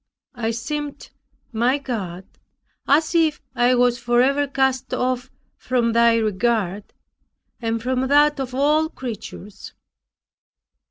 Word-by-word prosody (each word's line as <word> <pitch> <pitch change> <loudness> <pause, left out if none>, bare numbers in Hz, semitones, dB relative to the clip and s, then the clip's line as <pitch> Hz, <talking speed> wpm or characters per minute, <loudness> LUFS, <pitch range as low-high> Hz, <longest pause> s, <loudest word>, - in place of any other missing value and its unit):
I 235 -3 -2
seemed, 290 +6 -5 0.4
my 240 +4 +1
God, 195 -10 -5 0.6
as 310 +4 +3
if 320 -3 +2
I 250 0 +3
was 245 0 +2
forever 255 +4 +2
cast 265 -1 0
off 255 0 -1 0.3
from 240 -2 0
Thy 235 0 +5
regard, 215 -2 0 0.8
and 230 0 -1
from 255 +1 0
that 295 +1 +4
of 255 -1 -4
all 300 +3 +2
creatures. 215 - -8
250 Hz, 110 wpm, -22 LUFS, 230-275 Hz, 0.8 s, Thy